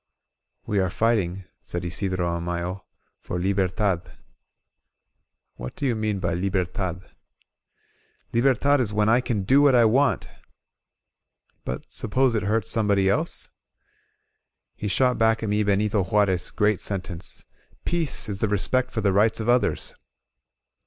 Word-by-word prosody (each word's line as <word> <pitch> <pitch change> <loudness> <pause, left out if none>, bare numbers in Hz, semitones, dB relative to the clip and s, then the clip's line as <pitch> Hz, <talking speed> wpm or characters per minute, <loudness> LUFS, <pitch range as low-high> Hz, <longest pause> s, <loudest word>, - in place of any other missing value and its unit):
We 105 - 0
are 95 -1 +1
fighting," 95 -3 0 0.2
said 90 0 -5
Isidro 95 0 -1
Amayo, 85 +2 -3 0.3
"for 90 - -5
Liber 95 +1 +1
tad." 95 -2 0 1.6
"What 60 0 -7
do 145 - -3
you 125 -4 +1
mean 110 -2 -1
by 90 -3 -1
Libertad?" 90 0 -2 1.3
"Libertad 135 +4 +3
is 115 -5 0
when 105 0 +2
I 120 +3 +4
can 110 -6 -2
do 135 +9 +4
what 140 -3 +5
I 120 - +6
wantT* 125 +2 +2 1.4
"But - - -6
suppose 130 +3 +1
it 110 - 0
hurts 105 +1 0
somebody 100 -4 +2
else?" 155 +8 -1 1.2
He 105 - -4
shot 125 +5 +2
back 115 0 +2
at 110 - -1
me 105 +1 +1
Benito 100 0 +1
Juarez' 95 -1 +1
great 105 -2 +1
sentence: 95 -3 -4 0.4
"Peace 165 -8 0
is 100 -2 -4
the 110 - +2
respect 130 +5 +1
for 110 - -3
the 100 -2 +2
rights 105 +4 +3
of 110 - -3
others 125 +1 +1
105 Hz, 140 wpm, -24 LUFS, 95-115 Hz, 1.6 s, I